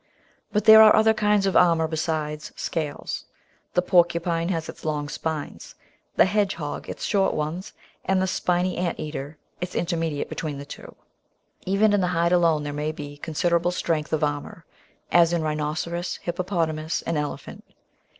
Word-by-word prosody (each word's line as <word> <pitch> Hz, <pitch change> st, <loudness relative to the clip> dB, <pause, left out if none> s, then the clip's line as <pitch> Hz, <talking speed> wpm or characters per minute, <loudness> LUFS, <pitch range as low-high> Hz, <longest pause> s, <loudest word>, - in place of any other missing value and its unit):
But 210 Hz, -1 st, 0 dB
there 220 Hz, 0 st, +10 dB
are 215 Hz, -1 st, +8 dB
other 220 Hz, 0 st, +5 dB
kinds 210 Hz, -2 st, +2 dB
of 195 Hz, -, 0 dB
armour 165 Hz, -2 st, +4 dB
besides 155 Hz, -1 st, -3 dB
scales. 155 Hz, -3 st, -4 dB, 0.5 s
The 180 Hz, -, +3 dB
Porcupine 170 Hz, -1 st, +2 dB
has 165 Hz, -3 st, -2 dB
its -, -, -10 dB
long 150 Hz, -2 st, -2 dB
spines, 155 Hz, -1 st, -5 dB, 0.4 s
the -, -, +6 dB
Hedgehog 190 Hz, -7 st, -2 dB
its -, -, -6 dB
short 195 Hz, -2 st, +1 dB
ones, 155 Hz, +5 st, -4 dB, 0.3 s
and 190 Hz, 0 st, +1 dB
the 190 Hz, -, +2 dB
Spiny 180 Hz, 0 st, 0 dB
Ant 175 Hz, -1 st, -2 dB
eater 150 Hz, -1 st, -6 dB, 0.2 s
is 180 Hz, 0 st, -5 dB
intermediate 165 Hz, -4 st, -1 dB
between 150 Hz, -3 st, -4 dB
the 140 Hz, -, -8 dB
two. -, -, -11 dB, 0.7 s
Even 205 Hz, +2 st, +3 dB
in 205 Hz, -, +3 dB
the 180 Hz, -, +1 dB
hide 170 Hz, +1 st, +2 dB
alone 165 Hz, -4 st, +3 dB
there 145 Hz, 0 st, -4 dB
may 150 Hz, +1 st, -2 dB
be 145 Hz, -2 st, -8 dB
considerable 170 Hz, +3 st, 0 dB
strength 165 Hz, -3 st, -2 dB
of 155 Hz, -1 st, 0 dB
armour 150 Hz, +4 st, -3 dB, 0.3 s
— -, -, -37 dB
as 170 Hz, 0 st, +3 dB
in 170 Hz, -2 st, 0 dB
Rhinoceros, 155 Hz, +3 st, -2 dB
Hippopotamus, 165 Hz, -3 st, -2 dB
and 165 Hz, -, -2 dB
Elephant. 150 Hz, -1 st, -5 dB
165 Hz, 160 wpm, -24 LUFS, 155-180 Hz, 0.7 s, there